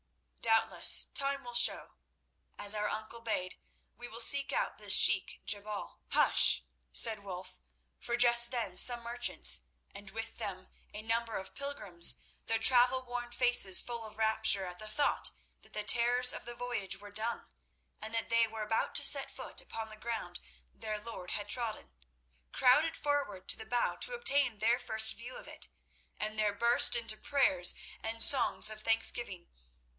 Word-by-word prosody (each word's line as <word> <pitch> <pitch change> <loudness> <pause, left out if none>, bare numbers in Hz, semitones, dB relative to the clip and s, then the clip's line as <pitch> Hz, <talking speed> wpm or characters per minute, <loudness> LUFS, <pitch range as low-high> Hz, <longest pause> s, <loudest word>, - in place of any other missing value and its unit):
"Doubtless 225 -1 +2
time 275 0 -2
will 245 0 -10
show. 240 - +2 0.6
As 205 0 0
our 210 -1 -3
uncle 220 +2 -7
bade, 200 -5 -5 0.4
we 245 +2 -11
will 230 0 -11
seek 275 +4 +4
out - - -3
this - - +1
Sheik - - +3
Jebal— 205 0 -2
" - - -44
"Hush!" 60 - +4 0.3
said 200 - +3
Wulf, 185 - -10 0.4
for 240 - -4
just 240 0 +6
then 230 -7 -4
some 240 +5 +7
merchants, 235 - +2 0.3
and 200 -1 -11
with 225 +4 -9
them 195 -4 -8 0.2
a 210 - -9
number 230 0 -3
of 190 - -9
pilgrims, 210 -12 +1 0.3
their 225 - -1
travel 250 +3 +3
worn 245 -1 -7
faces 240 -6 +2
full 235 -1 -7
of 215 -1 -12
rapture 220 -3 0
at 180 -1 -10
the 215 - -8
thought 250 +7 0 0.3
that - - -20
the 210 - -5
terrors 245 +3 +5
of - - -8
the 240 0 -9
voyage 235 -6 -5
were 205 0 -14
done, 220 +3 -4 0.5
and 220 - -7
that 225 - -3
they 230 0 +2
were 220 0 -7
about 225 +1 -3
to - - +4
set - - +4
foot - - -7
upon 225 -1 -8
the 215 - -12
ground 215 -6 -7 0.3
their 215 - -7
Lord 210 -5 -10
had 205 -1 -5
trodden, 220 - -4 0.6
crowded 290 +6 +2
forward 285 -11 -4
to - - +2
the 220 - -11
bow 240 +1 -1
to - - -1
obtain 280 - 0
their 230 +4 0
first 220 0 0
view 240 +3 -11
of - - -12
it, - - -4 0.5
and 215 0 -4
there 210 -1 0
burst 235 +3 +4
into 230 -2 0
prayers 215 -11 0 0.3
and 225 +1 +1
songs 265 -5 +5
of 215 0 -9
thanksgiving. 225 -4 -2
225 Hz, 170 wpm, -31 LUFS, 210-240 Hz, 0.6 s, some